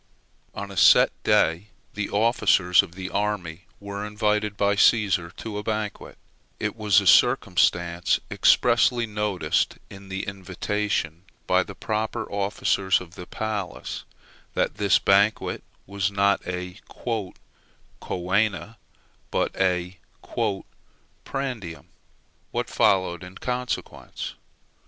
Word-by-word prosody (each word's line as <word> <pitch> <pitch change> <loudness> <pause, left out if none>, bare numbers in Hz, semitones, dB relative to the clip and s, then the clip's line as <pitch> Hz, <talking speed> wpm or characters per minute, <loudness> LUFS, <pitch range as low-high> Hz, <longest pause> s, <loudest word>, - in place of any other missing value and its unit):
On - - -6
a - - -10
set - - +7
day 85 +6 +2 0.3
the 105 -1 -3
officers 100 -5 +4
of 95 -4 -11
the 95 -1 -6
army 95 -5 -2
were 100 0 -6
invited 105 -1 -1
by 100 0 +2
Cæsar 100 -5 +3
to 105 -2 -5
a - - -6
banquet; 105 -2 -4 0.4
it - - -2
was 105 -2 +4
a - - -6
circumstance 90 -6 +3
expressly 120 0 +4
noticed 105 -7 -1
in 95 0 -12
the 95 0 -3
invitation, 95 -2 -3 0.2
by - - +3
the - - -7
proper 110 +1 -3
officers 100 -1 +1
of 90 -2 -12
the 90 - -10
palace, 105 -4 -4 0.5
that - - 0
the 100 -2 +3
banquet 100 +2 +3 0.2
was 100 -1 -1
not 100 0 +2
a 90 +1 -5
"coena," 105 -1 -4 0.5
but - - -1
a 90 -1 0 1.2
"prandium." 125 -12 -5 0.6
What - - -3
followed, 95 -4 +2
in 90 +1 -10
consequence? 125 0 -4
100 Hz, 110 wpm, -25 LUFS, 90-105 Hz, 1.2 s, set